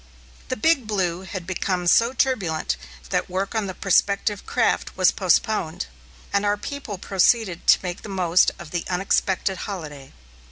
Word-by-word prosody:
The - - -2
Big 275 -1 +2
Blue 185 -4 -1
had 190 -2 -6
become 185 0 -2
so 230 +7 +4
turbulent 205 - 0 0.4
that - - 0
work 190 +3 -2
on 220 -3 -1
the 185 - -6
prospective 200 +1 +1
craft - - 0
was 185 -1 +5
postponed, 185 - +1 0.5
and 200 - +2
our 205 0 +1
people 235 -3 -6
proceeded 195 0 +1
to - - +7
make 180 -1 -4
the - - -9
most 180 -2 +3
of 175 -3 -10
the 175 -1 -2
unexpected 190 +1 0
holiday. 150 -8 -7
190 Hz, 155 wpm, -23 LUFS, 180-210 Hz, 0.5 s, to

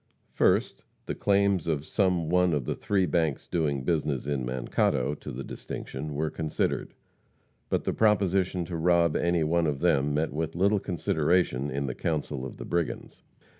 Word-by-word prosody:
First, - - +2 0.2
the - - -3
claims 100 -3 +2
of 75 -2 -1
some 90 -5 +1
one 90 0 +3
of 70 -5 -1
the - - -1
three 100 -2 0
banks 80 -4 0
doing 75 -6 -1
business 75 -4 0
in 70 -3 -1
Mankato 65 +2 0
to 75 - -8
the 65 +2 -6
distinction 75 +2 -6
were 75 +1 -1
considered. 80 -2 -2 0.7
But - - 0
the - - -1
proposition 95 -4 +2
to 85 - -5
rob 85 -1 +3
any 85 -1 +2
one 85 +1 +2
of 70 -2 -1
them 75 -4 +2
met 75 -1 0
with 80 +1 -3
little 100 +4 +3
consideration 80 -5 0
in 70 +1 -2
the 65 - -3
council 75 -4 -2
of - - -11
the - - -7
brigands. 85 -2 -3
80 Hz, 170 wpm, -28 LUFS, 70-90 Hz, 0.7 s, one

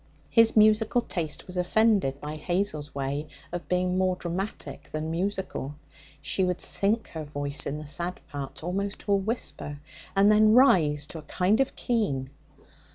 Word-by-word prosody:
His 230 -1 +5
musical 215 +2 +5
taste 165 -9 -4
was 180 0 -8
offended 185 -6 +2
by 150 +1 -5
Hazel's 155 -2 -2
way 140 +2 -2 0.2
of 175 0 -5
being 180 0 +1
more 185 -1 +2
dramatic 175 -5 -5
than 155 +1 -3
musical. 180 -5 -3 0.5
She 165 +7 0
would 180 -1 0
sink 215 +3 +1
her 160 -1 -6
voice 145 -1 -3
in 140 - -3
the 155 - -7
sad 170 +5 -3
parts 140 +1 -7
almost 195 +4 -2
to 205 - -3
a - - +6
whisper, 195 -8 -3 0.4
and 200 +2 +6
then 215 0 +6
rise 155 - +5
to 160 - -8
a - - -8
kind 180 - +1
of 270 - +1
keen. 140 - -1
180 Hz, 160 wpm, -27 LUFS, 150-205 Hz, 0.5 s, a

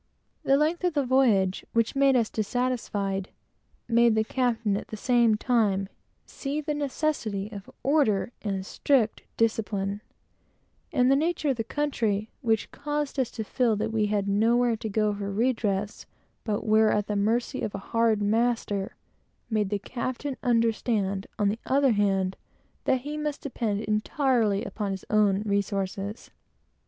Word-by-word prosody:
The 275 - +3
length 315 +4 +1
of 355 -3 +1
the 285 -2 +1
voyage, 225 -8 +3
which 230 +2 +1
made 275 -1 +4
us 230 -3 +2
dissatisfied, 210 -4 -1 0.6
made 235 -1 +4
the 220 - +3
captain, 230 -3 0
at 200 - -4
the 215 - -7
same 235 -1 +3
time, 210 -5 +1 0.4
feel 290 +2 -4
the 300 0 -1
necessity 270 -8 -2
of 200 -2 -9
order 255 -6 +2
and 195 -3 -3
strict 240 -1 +1 0.2
discipline; 205 -3 0 0.9
and 255 -4 +3
the - - +6
nature 310 0 0
of 260 - -3
the 225 - -1
country, 220 -6 -1
which 225 -4 0
caused 295 -1 -3
us 255 - +1
to 220 - -5
feel 230 +1 +1
that 220 +2 -2
we 215 -2 +2
had 205 -1 0
nowhere 230 +4 +3
to 220 0 -5
go 210 0 +1
for 200 0 -4
redress, 210 -2 -1 0.4
but 210 -1 -2
were 220 0 +5
entirely - - +3
at 205 - -1
the 210 - -2
mercy 230 +6 0
of 210 - -3
a 195 - -9
hard 225 -2 +3
master, 215 -2 0 0.6
made 210 -3 +1
the 205 - 0
captain 255 +5 -4
feel, 225 -4 +1 0.2
on 205 -2 +2
the 215 +3 -2
other 275 0 +4
hand, 195 -3 +1 0.5
that 260 - +2
he 295 +3 -5
must 300 -1 -3
depend 225 -7 -2
entirely 215 -1 +1
upon 205 -2 -3
his 190 -1 -5
own 210 -2 +3
resources. 200 0 -2
220 Hz, 155 wpm, -27 LUFS, 205-255 Hz, 0.9 s, the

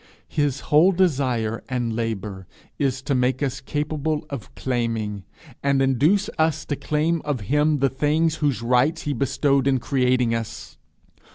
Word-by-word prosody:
his 145 -3 0
whole 160 +6 +5
desire 130 - 0
and 120 -3 -1
labour 105 -5 -4 0.3
is 135 -2 0
to 140 - -1
make 130 +1 +1
us 135 0 -2
capable 150 +2 -2
of 135 -6 -7
claiming, 115 -6 -2 0.4
and 140 -1 +2
induce 145 - +3
us 160 0 +1
to 145 - -2
claim 155 +3 0
of 145 -6 -2
him 150 +7 +2
the 135 0 +3
things 155 +4 +1
whose 145 -6 0
rights 125 +7 +2
he 145 - -1
bestowed 140 +1 +1
in 135 -1 +3
creating 125 -1 +1
us. 115 -1 -5
135 Hz, 150 wpm, -23 LUFS, 120-150 Hz, 0.4 s, whole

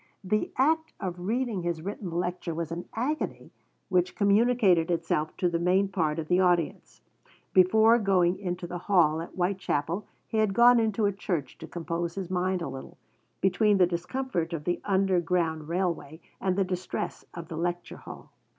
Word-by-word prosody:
The 215 +3 0
act 320 +4 +2
of 180 -2 -4
reading 235 -3 -1
his 170 -2 -3
written 200 0 -5
lecture 175 0 -3
was 165 -1 -4
an 170 +1 -4
agony 275 +7 -3 0.4
which 180 -1 +1
communicated 200 -4 +3
itself 165 -2 -1
to 180 - +1
the 170 -1 0
main 185 +3 +2
part 160 -5 0
of 160 -1 -4
the 180 +2 +3
audience. 175 -3 0 0.5
Before 220 +5 +5
going 185 -3 +2
into 180 -2 -4
the 175 0 -5
hall 165 -5 +3
at 170 - -7
Whitechapel 180 -1 -1 0.2
he 220 - -1
had 210 -3 +1
gone 240 +1 +7
into 220 -1 +1
a 200 - +3
church 175 -6 -4
to 160 - -8
compose 170 0 -4
his 190 -2 -5
mind 185 0 0
a - - -3
little, 135 0 -9 0.4
between 205 +2 +3
the 185 - +6
discomfort 175 +1 -3
of 155 -3 -4
the 175 +2 -1
underground 180 -5 +1
railway 170 -4 -2 0.2
and 190 -1 +1
the 195 - +2
distress 185 -1 -4
of 170 -1 -7
the 165 - -5
lecture 175 +1 -3
hall. - - -11
180 Hz, 170 wpm, -28 LUFS, 170-200 Hz, 0.5 s, gone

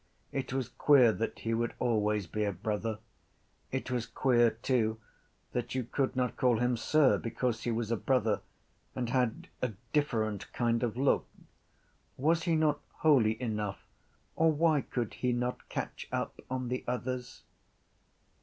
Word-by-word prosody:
It 135 -2 -3
was 130 -2 -1
queer 130 -2 +5
that 115 +1 -3
he 115 - -2
would 120 +1 -1
always 105 -4 +1
be 105 +6 -2
a 100 - +1
brother. 105 +3 -2 0.7
It 130 0 -3
was 120 -2 -1
queer 120 -3 +3
too 110 -1 0 0.5
that 125 +1 -3
you 130 - 0
could 130 +3 -1
not 125 -1 0
call 125 -3 +3
him 125 +1 +2
sir 140 +4 +3
because 115 0 -2
he 120 - +1
was 115 0 -2
a 115 - +2
brother 115 -3 +1 0.5
and 120 -2 -2
had 125 -3 0
a 125 -3 -1 0.2
different 110 -9 0
kind 115 -1 +1
of 120 -2 -1
look. 135 +1 +2 0.9
Was 160 +5 +2
he 170 -2 +2
not 155 -2 +2 0.2
holy 120 -8 +4
enough 105 -5 -3 0.5
or 160 0 +4
why 155 -1 +3
could 120 -4 -3
he 125 -1 0
not 125 +1 -3
catch - - -4
up - - -3
on 130 -1 -2
the 125 0 -2
others? 125 0 -3
125 Hz, 155 wpm, -31 LUFS, 115-130 Hz, 0.9 s, queer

